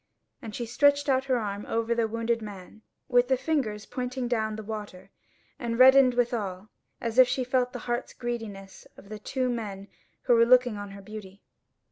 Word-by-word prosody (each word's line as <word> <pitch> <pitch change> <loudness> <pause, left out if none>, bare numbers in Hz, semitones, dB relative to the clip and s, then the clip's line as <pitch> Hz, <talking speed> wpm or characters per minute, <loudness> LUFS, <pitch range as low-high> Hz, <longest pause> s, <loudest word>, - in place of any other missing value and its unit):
And 220 -2 -8
she 240 - -3
stretched 285 +4 +3
out 265 0 +2
her 260 -2 +1
arm 205 -2 -4
over 230 +1 0
the 230 -1 +1
wounded 230 +1 -1
man, 205 0 -10 0.3
with 245 0 +3
the 260 0 +2
fingers 245 -9 -2
pointing 250 0 -4
down 220 -3 -1
the 220 - -7
water, 205 -3 -8 0.5
and 235 -4 -3
reddened 260 0 +7
withal, 215 -5 -2 0.3
as 230 +1 -1
if 255 - +9
she 255 +1 -1
felt 250 0 0
the 250 - -6
hearts' 240 0 -3
greediness 220 -5 -6
of 195 - -15
the 215 0 -7
two 255 +4 -2
men 205 -5 -4 0.3
who 245 - +3
were 230 0 +6
looking 250 -2 +5
on 205 0 -6
her 200 0 -11
beauty. 205 -2 -10
230 Hz, 185 wpm, -27 LUFS, 210-250 Hz, 0.5 s, if